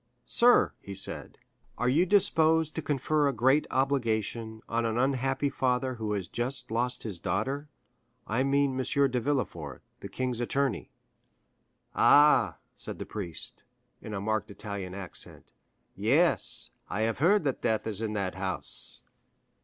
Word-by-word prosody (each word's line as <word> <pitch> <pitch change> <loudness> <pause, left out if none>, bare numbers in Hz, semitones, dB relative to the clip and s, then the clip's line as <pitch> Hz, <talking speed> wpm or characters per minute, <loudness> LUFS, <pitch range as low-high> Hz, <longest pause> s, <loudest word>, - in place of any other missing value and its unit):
"Sir," 245 +1 +5
he 100 - -8
said, 95 - 0 0.4
"are 125 - 0
you 160 +9 +3
disposed 160 -5 +4
to 160 - -3
confer 145 +1 +1
a - - +2
great 130 +6 +3
obligation 115 -4 -1
on 115 0 0
an 115 0 -1
unhappy 135 +2 +1
father 130 0 0
who 110 -3 -3
has 95 -3 -3
just 120 +4 -4
lost 120 +2 -1
his 100 -6 -4
daughter? 130 - -2 0.6
I 115 +4 0
mean 140 +1 +2
M. 140 +1 +2
de 125 - +1
Villefort, 110 - -3 0.2
the 100 - -8
king's 125 +3 -2
attorney." 120 - -1 1.0
"Ah," 135 - +5 0.2
said - - -6
the - - -6
priest, 90 -7 -4 0.4
in 105 - -6
a - - -2
marked 110 +2 -1
Italian 100 -3 -6
accent; 95 -3 -6 0.4
"yes, - - +2 0.2
I 105 - -2
have 115 +1 0
heard 185 +6 +4
that 135 -3 -1
death 110 -1 0
is 110 -1 -3
in 110 -1 -2
that 100 -3 -2
house." 95 -10 -5
120 Hz, 145 wpm, -29 LUFS, 105-140 Hz, 1.0 s, Sir